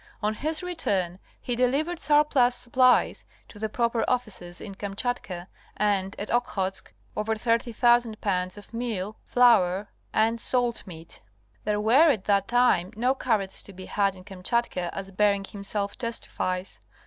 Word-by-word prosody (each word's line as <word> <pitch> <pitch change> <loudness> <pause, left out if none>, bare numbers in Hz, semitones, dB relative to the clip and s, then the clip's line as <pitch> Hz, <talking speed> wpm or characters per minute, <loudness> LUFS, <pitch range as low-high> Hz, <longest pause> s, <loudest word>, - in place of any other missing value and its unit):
On 210 +1 +1
his 310 +8 -2
return 195 - -1 0.2
he 245 - -2
delivered 285 +8 +1
surplus 295 -5 +3
supplies 255 +1 +3 0.3
to 205 - -13
the 220 0 -2
proper 235 +1 0
officers 215 -8 -2
in 200 - -8
Kamchatka 200 -2 -4 0.3
and 200 -2 +1
at 205 - -4
Okhotsk 195 -5 -1 0.2
ever 220 +1 -1
30,000 230 0 +2
lbs. 185 -1 -1
of 205 +2 -13
meal, 220 -3 -3
flour 210 -6 +4 0.2
and 225 +1 +1
salt 245 -4 +1
meat. 165 -2 -10 0.4
There 210 -1 +1
were 255 +10 +5
at 220 -10 +1
that 200 -1 +2
time 245 -7 +3
no 250 +4 +2
carrots 215 -8 0
to 200 - -7
be 185 0 -9
had 200 -2 0
in 185 - -13
Kam 190 -2 -11
chatka 185 -5 0
as 195 0 -6
Bering 200 0 +2
himself 200 0 -3
testifies. 195 -6 -3
215 Hz, 150 wpm, -26 LUFS, 195-245 Hz, 0.4 s, were